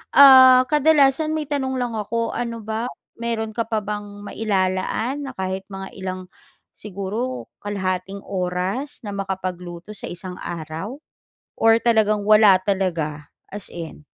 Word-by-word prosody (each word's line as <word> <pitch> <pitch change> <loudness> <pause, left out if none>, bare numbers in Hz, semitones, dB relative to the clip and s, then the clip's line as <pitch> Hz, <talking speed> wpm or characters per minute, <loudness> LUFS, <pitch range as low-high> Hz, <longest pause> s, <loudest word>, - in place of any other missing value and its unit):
ah, 260 -2 +9
kadalasan 300 0 +4
may 310 - -1
tanong 265 -2 -1
lang 240 -3 -2
ako. 230 +2 -2
Ano 230 -2 -4
ba 220 +3 -3 0.3
mayro'n 230 -2 -2
ka 230 +1 -3
pa 220 -2 -1
bang 205 0 -6
mailalaan 205 +5 -1
na - - -6
kahit 190 0 -4
mga 195 -1 -8
ilang 185 0 -4 0.5
siguro 210 +6 -5
kalahating 195 -1 -3
oras 190 +9 -3
na 205 - -5
makapagluto 185 -2 -5
sa 210 - -6
isang 180 +1 -6
araw 170 - -6 0.6
or 225 0 +5
talagang 215 -3 +2
wala 210 -2 +7
talaga 170 -6 -2 0.2
as 205 -2 -2
in? 165 -3 -8
205 Hz, 130 wpm, -22 LUFS, 185-235 Hz, 0.6 s, ah